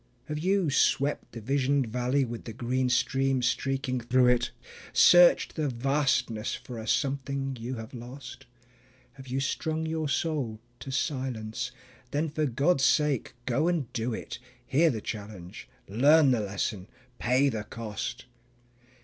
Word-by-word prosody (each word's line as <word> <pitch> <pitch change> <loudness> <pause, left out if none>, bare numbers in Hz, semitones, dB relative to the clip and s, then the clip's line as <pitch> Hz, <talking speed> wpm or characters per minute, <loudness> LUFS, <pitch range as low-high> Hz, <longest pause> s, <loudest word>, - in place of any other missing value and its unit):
Have 150 0 -4
you 185 -2 +1
swept 140 +1 +1
the 115 - -7
visioned 135 +3 +1
valley 125 +4 0
with 120 -1 -7
the 115 - -6
green 125 +2 -1
stream 130 +1 +1
streaking 130 +1 0
through 125 +1 +3
it, 125 -1 +2 0.4
Searched 175 0 +6
the 155 -2 0
Vastness 130 -3 0
for 120 -3 -8
a 110 - -7
something 135 +1 -1
you 120 +3 -4
have 115 +1 -8
lost? 130 +2 -9 0.7
Have 135 0 -13
you 130 +2 -2
strung 160 +3 -2
your 160 -1 -2
soul 140 -6 -1 0.2
to - - -8
silence? 130 -3 -2 0.4
Then 150 +4 -1
for 155 0 -1
God's 140 +4 +2
sake 145 -3 +2
go 135 +6 +1
and 165 -9 -1
do 120 0 -1
it; 110 - -6 0.3
Hear 160 +7 +3
the 115 -7 -3
challenge, 100 -5 -8 0.2
learn 140 +7 +5
the 120 - +2
lesson, 100 -1 -3 0.3
pay 130 +4 +3
the 110 -4 -3
cost. 115 +3 -6
130 Hz, 145 wpm, -28 LUFS, 120-140 Hz, 0.7 s, Searched